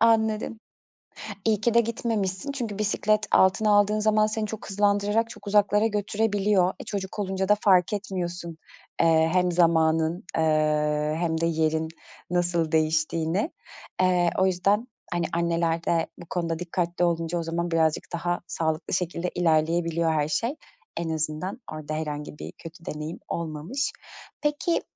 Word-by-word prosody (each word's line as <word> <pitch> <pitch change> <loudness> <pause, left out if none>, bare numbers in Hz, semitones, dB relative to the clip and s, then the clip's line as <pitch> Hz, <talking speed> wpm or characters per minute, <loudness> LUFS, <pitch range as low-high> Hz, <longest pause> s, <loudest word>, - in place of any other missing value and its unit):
Anladım. 220 -1 +2 0.9
İyi 215 -2 +3
ki 235 +1 +1
de 235 - +7
gitmemişsin 225 -1 -2
çünkü 230 -7 -4
bisiklet 215 +1 +1
altına 190 +3 +4
aldığın 205 +1 +4
zaman 215 0 +3
seni 215 0 -2
çok 215 -1 -7
hızlandırarak 205 +3 +2
çok 205 - -12
uzaklara 205 +1 +3
götürebiliyor. 205 -2 +1
E, - - -6
çocuk 195 0 -5
olunca 190 -1 -1
da 210 - +5
fark 185 -3 +4
etmiyorsun, 175 -4 -4 0.4
eee, 160 -1 +4
hem 180 -1 +2
zamanın, 165 0 +2
eee, 150 -1 +1
hem 165 -1 0
de 165 - +2
yerin 160 -1 +1 0.4
nasıl 175 -2 +1
değiştiğini. 160 - +1 0.5
Eee, 180 -2 +3
o 190 - +4
yüzden, 200 +5 +1 0.3
hani, 175 -1 0
anneler 170 -1 0
de 165 -1 +1
bu 175 - -11
konuda 165 -2 -1
dikkatli 175 0 -1
olunca 170 0 0
o - - -2
zaman 170 +1 -2
birazcık 160 -2 +2
daha 175 +1 -1
sağlıklı 160 0 -1
şekilde 180 0 -1
ilerleyebiliyor 165 0 +2
her 150 -1 +1
şey. 230 - -1 0.4
En 165 -1 -2
azından 155 - -2
orada 155 0 -5
herhangi 150 -1 -4
bir - - -7
kötü 165 +1 -12
deneyim 150 +2 -5
olmamış. 170 - -2 0.5
Peki, 295 +3 0
175 Hz, 140 wpm, -26 LUFS, 160-205 Hz, 0.9 s, de